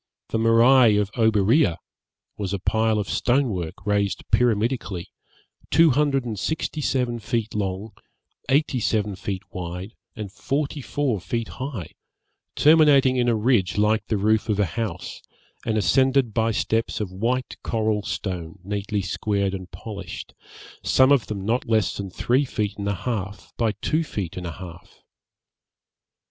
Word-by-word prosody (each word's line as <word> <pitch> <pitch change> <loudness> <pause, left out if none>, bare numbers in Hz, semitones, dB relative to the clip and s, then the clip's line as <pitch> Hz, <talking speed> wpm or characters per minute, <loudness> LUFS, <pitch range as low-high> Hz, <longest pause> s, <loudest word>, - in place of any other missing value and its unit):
The 115 - -1
morai 115 0 +6
of 105 -1 0
Oberea 110 - +3 0.6
was 100 -2 -3
a - - 0
pile 110 +3 +1
of 105 -2 -2
stone 130 +1 +1
work 90 -4 -5
raised 100 -1 0
pyramidically, 110 -5 +1 0.6
two 165 +1 +5
hundred 135 -1 +1
and 110 -4 -4
sixty 155 +4 -2
seven 125 -4 0
feet 110 0 -2
long, 100 +1 -3 0.6
eighty 140 -1 +2
seven 105 -3 0
feet 95 0 -4
wide, 90 +4 -6 0.2
and 105 -4 -6
forty 140 +6 -2
four 130 -5 -1
feet 115 +4 -3
high, 130 - -6 0.6
terminating 145 -4 +5
in 120 -1 +2
a 115 - +3
ridge 105 -5 +2
like 105 0 +2
the 110 - 0
roof 110 +2 +1
of 105 -1 +1
a 105 - +4
house, 90 0 -5 0.5
and 110 -1 +1
ascended 130 +4 +3
by 115 0 +2
steps 115 +1 0
of 105 -4 -3
white 120 +7 -1
coral 110 -2 0
stone 90 -3 -4
neatly 100 +1 -2
squared 100 +1 -1
and 95 -2 -6
polished, 100 -4 -8 0.5
some 130 +1 +4
of 140 -4 +3
them 100 -3 -4
not 115 +2 0
less 110 -4 +2
than 100 -1 -5
three 125 +8 +1
feet 105 -6 -2
and 100 - -3
a 100 - 0
half 105 -2 -4
by 115 -2 +1
two 160 +2 +1
feet 100 - -5
and 90 -1 -5
a 85 - -5
half. 85 -1 -12
110 Hz, 155 wpm, -24 LUFS, 100-125 Hz, 0.6 s, morai